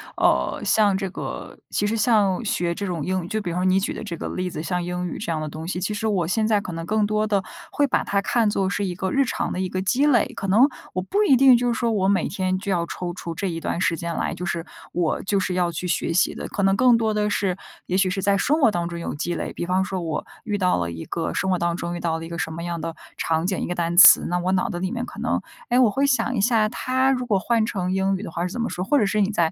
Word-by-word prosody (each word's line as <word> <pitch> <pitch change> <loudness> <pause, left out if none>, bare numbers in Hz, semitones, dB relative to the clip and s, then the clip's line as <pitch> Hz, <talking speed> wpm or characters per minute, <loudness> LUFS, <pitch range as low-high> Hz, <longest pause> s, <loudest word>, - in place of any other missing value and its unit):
呃， - - +1
像 205 -3 +3
这 195 -1 -3
个 - - -7
其 205 - -1
实 220 +2 0
像 210 -2 +2
学 180 -6 0
这 200 +3 -4
种 170 -4 -3
英 185 -2 -1
语 - - -7
就 215 +4 -2
比 180 -4 -4
方 175 - -2
说 - - +1
你 185 0 +4
举 195 - 0
的 - - -6
这 205 -6 -5
个 - - -5
例 185 0 -3
子， 155 - -6
像 180 +1 -1
英 180 +1 -3
语 - - -6
这 210 - -5
样 155 - -2
的 155 - -4
东 155 +2 -7
西， 180 0 -3
其 195 +3 -1
实 220 +1 -2
我 190 -5 +1
现 215 +6 0
在 210 -2 +2
可 185 - -7
能 165 0 -5
更 215 +2 +1
多 215 +1 0
的 200 -2 +1 0.3
会 290 - +3
把 275 - 0
它 200 0 +1
看 225 +2 +1
作 195 -2 0
是 200 0 -1
一 180 -2 -3
个 190 +1 -2
日 275 0 +3
常 - - -2
的 - - -3
一 185 - 0
个 185 +1 -3
积 255 +9 +2
累， 260 -7 +3
可 195 - -5
能 225 +9 +5 0.2
我 185 - -1
不 405 - +1
一 275 - +6
定 260 -1 +7
就 245 +1 0
是 - - -4
说， 235 -2 0
我 195 -3 +1
每 200 0 +1
天 185 -2 -1
就 200 +1 -4
要 170 -2 +1
抽 175 +1 -5
出 170 -2 -6
这 200 - -2
一 165 -2 -3
段 170 - -3
时 170 -3 +1
间 170 -1 -4
来， - - -1
就 180 - -5
是 170 -1 -3 0.3
我 170 -2 0
就 195 0 +1
是 185 - -1
要 180 -1 +1
去 170 +2 -5
学 170 - 0
习 175 - +2
的， - - -6
可 200 - -3
能 195 0 +3
更 250 -2 +5
多 220 -1 +1
的 210 0 0
是， 195 -3 0 0.3
也 185 - -1
许 190 -1 +3
是 195 +1 -2
在 200 +1 +2
生 300 +9 +1
活 230 - +5
当 170 -3 -2
中 170 - -6
有 170 - -4
积 170 +4 -3
累。 - - -4
比 - - -4
方 185 +2 +1
说 190 -1 -3
我 165 -3 -3 0.2
遇 210 -2 -1
到 180 -2 +2
了 85 -1 -2
一 80 -1 -6
个 165 - -3
生 190 - -1
活 180 - +1
当 170 0 0
中 175 0 -4
遇 - - -6
到 165 -1 -1
了 165 - -7
一 165 - -7
个 170 0 -5
什 160 - -2
么 170 +1 -6
样 170 -1 -3
的 165 0 -5 0.2
场 160 +1 0
景 190 0 -1
一 - - -3
个 180 - -3
单 170 0 -1
词， - - +9
那 180 +1 0
我 180 +1 0
脑 185 - +1
子 175 - -4
里 185 +1 -2
面 245 0 -3
可 - - -10
能， - - 0 0.3
诶， 245 - +3
我 250 -4 +5
会 270 +7 +1
想 260 -2 +1
一 - - 0
下， 220 -1 +3
它 260 +3 +1
如 250 -2 -1
果 210 -5 +1
换 230 +2 +1
成 185 -5 -2
英 190 +1 +1
语 190 - -5
的 - - -6
话 170 - -3
是 180 - -8
怎 240 - -3
么 230 - -1
说？ 180 - -3
或 290 - +3
者 210 - +3
是 205 +2 0
你 195 - +2
在 170 -5 +1
190 Hz, 335 characters per minute, -23 LUFS, 175-215 Hz, 0.3 s, 词